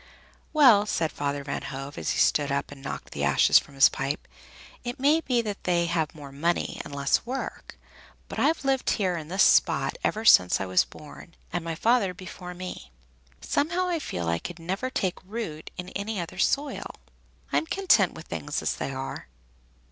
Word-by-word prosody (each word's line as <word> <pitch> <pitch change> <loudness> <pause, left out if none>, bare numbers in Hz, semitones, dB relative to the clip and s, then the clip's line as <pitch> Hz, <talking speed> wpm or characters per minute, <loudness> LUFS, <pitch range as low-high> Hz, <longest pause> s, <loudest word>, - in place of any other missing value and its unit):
"Well," 245 -9 +6
said 160 -5 0
Father 145 0 -3
Van 140 0 -3
Hove, 135 +1 -6
as - - -3
he - - 0
stood 145 -1 +3
up 140 0 -1
and 140 -1 -11
knocked 140 - -6
the - - -3
ashes - - +5
from 140 - -14
his 135 - +8
pipe, 135 +2 -3 0.6
"it 245 0 -5
may 295 +4 +4
be 245 -6 +1
that 205 -2 -5
they 175 -1 +2
have 165 -2 -1
more 145 -3 -10
money 165 +5 -1
and 140 - -8
less 140 -1 +1
work, 260 +3 -6 0.5
but - - -6
I've 320 -3 +1
lived 270 -1 +1
here 185 -4 +1
in 160 -3 -6
this 190 +4 +3
spot - - +3
ever 220 +1 -1
since 90 - +6
I 95 - -2
was 95 -1 +3
born, 155 +3 -13 0.2
and 175 - -1
my 165 -1 -3
father 215 -1 +2
before 180 0 -9
me. 180 - -7 0.5
Somehow 345 +5 0
I 340 -2 0
feel 85 - -4
I 85 0 +1
could 175 - -7
never 190 +9 -3
take 190 -8 -2
root 185 -6 -6
in 180 0 -6
any 200 +1 -4
other 170 -1 -6
soil. 285 0 0 0.6
I'm 320 - +2
content 385 +2 +3
with - - -10
things - - -4
as - - -1
they - - -3
are." 135 0 -6
180 Hz, 190 wpm, -26 LUFS, 145-235 Hz, 0.6 s, his